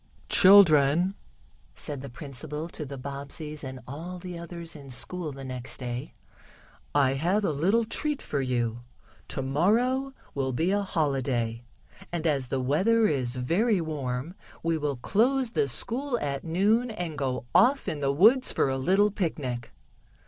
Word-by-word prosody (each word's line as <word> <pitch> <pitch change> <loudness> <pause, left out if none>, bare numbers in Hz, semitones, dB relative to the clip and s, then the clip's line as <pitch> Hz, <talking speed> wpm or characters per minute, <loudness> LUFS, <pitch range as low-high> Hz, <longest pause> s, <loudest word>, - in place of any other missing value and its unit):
"Children," 175 -2 +6 0.6
said 145 -3 -6
the 140 - -7
principal 150 +4 -6
to 155 -3 -6
the 140 0 -7
Bobbseys 140 +3 -7
and 130 -1 -6
all 165 +7 -6
the 180 0 -7
others 170 -1 -7
in 140 -2 -11
school 150 +7 -4
the 135 0 -9
next 130 -1 -6
day, 125 -1 -5 0.8
"I 135 -2 +4
have 180 +9 +1
a - - +1
little 195 +11 +2
treat 295 +6 -2
for 140 - -2
you. 120 -3 -1 0.5
Tomorrow 230 - +1 0.2
will 135 -2 -1
be 165 +9 +1
a 205 0 +2
holiday, 135 - -1 0.5
and, 170 -1 -3
as 140 -5 +1
the 130 +2 -1
weather 190 - +3
is 130 - 0
very 185 - +1
warm, 145 -2 -3 0.3
we 165 0 +1
will 150 -2 -1
close 240 - +1
the 140 - +1
school 240 - -2
at 140 -1 -3
noon, 205 +9 +2
and 175 -8 -4
go 130 -3 -2
off 270 +3 +4
in 150 - -2
the 140 -1 +1
woods 225 - +5
for - - +1
a 135 - -1
little 195 +9 +3
picnic." 140 - -3
150 Hz, 155 wpm, -27 LUFS, 135-195 Hz, 0.8 s, Children